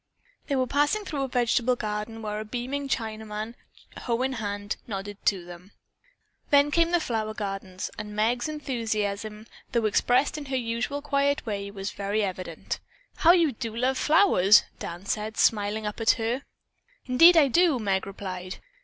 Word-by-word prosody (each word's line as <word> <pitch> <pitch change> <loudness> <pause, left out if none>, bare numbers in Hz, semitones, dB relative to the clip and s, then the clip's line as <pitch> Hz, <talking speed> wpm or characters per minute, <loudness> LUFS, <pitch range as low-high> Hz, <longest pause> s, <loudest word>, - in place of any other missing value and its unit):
They 280 - 0
were 260 -1 +2
passing 295 - +1
through 295 -6 -3
a 270 - 0
vegetable 245 0 +2
garden 215 0 -4
where 210 0 -3
a - - -3
beaming 255 +5 -4
Chinaman, 220 -2 -3 0.5
hoe 240 0 -1
in 265 0 0
hand, 205 -2 -4
nodded 205 -1 -6
to 185 -4 +2
them. 175 +3 -12 0.8
Then 285 0 +5
came 335 +1 +3
the 350 0 +3
flower 220 -7 -2
gardens 195 -3 -5
and 210 0 -6
Meg's 240 +6 +1
enthusiasm, 220 -7 -3 0.3
though 235 -2 +2
expressed 250 +7 +2
in 290 - -8
her 270 -1 -3
usual 245 +4 -2
quiet 285 -1 +1
way, 200 -2 -3
was 195 0 -5
very 205 +2 -1
evident. 185 -2 -4 0.4
"How 340 +1 +6
you 335 -5 +3
do 230 -2 -6
love 255 +3 +1
flowers," 265 - +5 0.2
Dan 175 +3 -7
said, 215 +2 -3
smiling 210 0 +2
up 210 +2 -4
at 225 - +4
her. 235 +4 -2 0.6
"Indeed 330 +7 +7
I 300 -3 +7
do!" 335 +1 +3
Meg 195 -4 -1
replied. 185 -2 -6
225 Hz, 160 wpm, -26 LUFS, 205-270 Hz, 0.8 s, Indeed